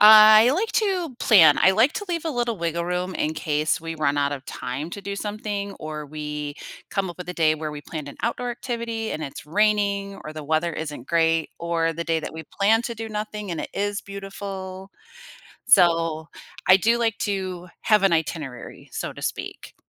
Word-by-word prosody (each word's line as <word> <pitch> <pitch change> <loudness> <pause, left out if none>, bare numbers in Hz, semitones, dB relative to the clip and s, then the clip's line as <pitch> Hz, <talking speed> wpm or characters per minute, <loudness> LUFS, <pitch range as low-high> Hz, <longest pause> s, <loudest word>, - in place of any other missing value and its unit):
I 215 +2 +9
like 405 +10 0
to 365 - 0
plan, 165 -10 +7
I 190 - +6
like 225 +9 +4
to 410 - -3
leave 335 -2 -2
a 320 - -1
little 240 -4 -1
wiggle 170 0 -2
room 180 +1 -2
in 155 +1 -1
case 155 0 0
we 165 0 -5
run 145 -2 +1
out 140 0 +1
of 135 -2 -6
time 130 +6 -5
to 200 - -6
do 200 0 -4
something 205 -1 -4
or 155 -1 -5
we 150 -1 -5 0.3
come 195 -3 -2
up 175 - -12
with 180 -1 -8
a - - -2
day 155 -2 +3
where 155 -1 -4
we 150 - -7
planned 150 -1 -7
an 140 - -10
outdoor 245 +1 -1
activity 235 -2 -4
and 155 - -3
it's 140 - -8
raining 200 +2 +1
or 155 - -7
the 155 -1 -7
weather 160 +3 +1
isn't 150 -5 -6
great, 165 -1 +2
or 165 -1 0
the 170 +1 -4
day 165 -1 0
that - - -6
we 160 0 -7
plan 220 +3 +3
to 235 -1 -4
do 225 0 -6
nothing 210 -1 -5
and 170 - -3
it - - -5
is 205 0 -1
beautiful. 195 -1 -7 0.8
So, 165 -7 +4 0.4
I 185 - +8
do 230 +4 +3
like 225 -2 0
to 185 -3 -3
have 210 -2 +4
an 195 -3 +4
itinerary, 155 -6 -3
so - - -4
to - - -11
speak. - - -5
185 Hz, 200 wpm, -24 LUFS, 155-215 Hz, 0.8 s, I